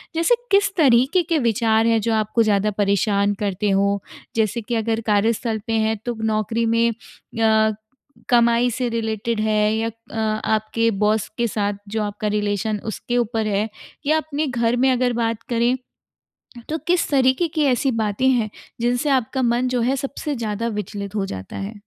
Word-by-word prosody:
जैसे 335 +9 +3 0.2
किस 400 0 +4
तरीके 270 +4 +4
के 330 -1 0
विचार 225 -1 +2
हैं 225 -1 +3
जो 225 +1 0
आपको 220 +1 +2
ज़्यादा 210 0 +2
परेशान 200 0 +2
करते 205 0 -1
हो? 200 +1 +2 0.4
जैसे 225 +1 0
कि 235 +2 -3
अगर 225 0 0
कार्यस्थल 220 +2 +1
पे 225 - -1
हैं 220 0 +1
तो 240 - -1
नौकरी 220 +1 0
में 230 +1 +2 0.4
या 220 -1 +3 0.6
कमाई 235 0 +4
से 250 +1 -1
रिलेटेड 225 0 -2
है? 215 0 +2
या 225 +1 0
अ, 230 0 -11 0.3
आपके 220 +1 +1
बॉस 210 +1 +1
के 235 0 +1
साथ 205 -1 -1
जो 215 +1 -2
आपका 210 +1 -3
रिलेशन 210 0 -1
उसके 240 +2 -3
ऊपर 225 -2 0
है? 210 +2 0 0.4
या 310 +2 +3
अपने 310 -1 -2
घर 235 -1 +1
में 260 +2 +3
अगर 250 -1 +1
बात 230 -1 -1
करें, 240 +2 +2 0.9
तो 315 - -1
किस 355 0 +2
तरीके 265 +4 +3
की 310 -1 -1
ऐसी 260 0 +2
बातें 220 +3 0
हैं, 235 -4 +1 0.3
जिनसे 245 +4 +1
आपका 260 0 +1
मन 240 +1 +1
जो 250 -1 0
है 260 +3 +1
सबसे 280 +1 -4
ज़्यादा 225 0 -3
विचलित 205 -1 -5
हो 195 -2 0
जाता 95 - -7
है? 200 +3 -5
225 Hz, 175 wpm, -21 LUFS, 215-245 Hz, 0.9 s, किस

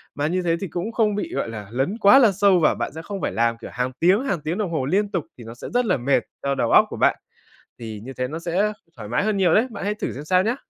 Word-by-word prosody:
Mà 145 +1 -1
như 180 +3 0
thế 170 -2 +1
thì 195 - -3
cũng 180 +6 -4
không 215 -3 +1
bị, 330 - -4
gọi 115 - -2
là, 105 -3 -7
lấn 135 - -1
quá 220 +5 +7
là 230 -6 +5
sâu 195 -1 +3
và 155 - +3
bạn - - -3
sẽ 160 - -6
không 195 +2 -6
phải - - -1
làm, 115 0 +1
kiểu, - - -9
hàng 125 +1 -2
tiếng, 190 +9 +3
hàng 195 - -2
tiếng 160 +6 -3
đồng 200 -5 -2
hồ 135 -5 -1
liên 200 +7 0
tục, 175 -5 -2
thì 120 - -11
nó 115 - -9
sẽ 120 - -9
rất 245 0 +2
là 185 -8 +2
mệt 135 +3 +1 0.2
cho 140 0 0
đầu - - 0
óc - - +7
của - - -7
bạn. - - +3 0.6
Thì 110 -3 -7
như 135 - -7
thế 125 -1 -3
nó 155 +4 -5
sẽ 180 +5 0 0.2
thoải 105 -2 -8
mái 125 - 0
hơn 215 -2 0
nhiều 180 -4 +3
đấy, 225 - +4
bạn 205 - -6
hãy 210 +1 0
thử - - -4
xem 145 +3 -8
sao 185 +3 +3
nhá. 230 +6 0
175 Hz, 310 wpm, -23 LUFS, 135-205 Hz, 0.6 s, quá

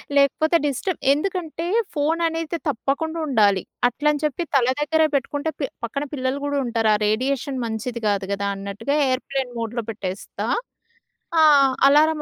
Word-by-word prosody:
లేకపోతే, 285 +4 +3
డిస్టర్బ్ 295 +6 -2
ఎందుకంటే 335 0 -3 0.3
ఫోన్ 305 +3 +1
అనేది 330 0 -3
తప్పకుండా 290 +5 -2
ఉండాలి. 205 -8 +3 0.2
అట్లని 295 +4 0
చెప్పి 300 +3 -1
తల 260 -3 +4 0.2
దగ్గర 320 +2 +2
పెట్టుకుంటే 285 +3 -1
పె 285 - 0 0.2
పక్కన 275 +5 -2
పిల్లలు 260 0 -1
గూడా 285 0 -1
ఉంటారు. 225 -2 +1
ఆ - - +1
రేడియేషన్ 265 +5 -1
మంచిది 230 +1 -4
గాదు 200 -2 0
గదా! 200 0 -1
అన్నట్టుగా 200 +7 -3 0.2
ఏర్‌ప్లేన్ 265 0 -2
మోడ్‌లో 230 +1 -3
పెట్టేస్తా. 195 -3 -5 0.9
ఆ! - - +7 0.5
అలారం 305 +2 +4
275 Hz, 140 wpm, -22 LUFS, 230-300 Hz, 0.9 s, ఆ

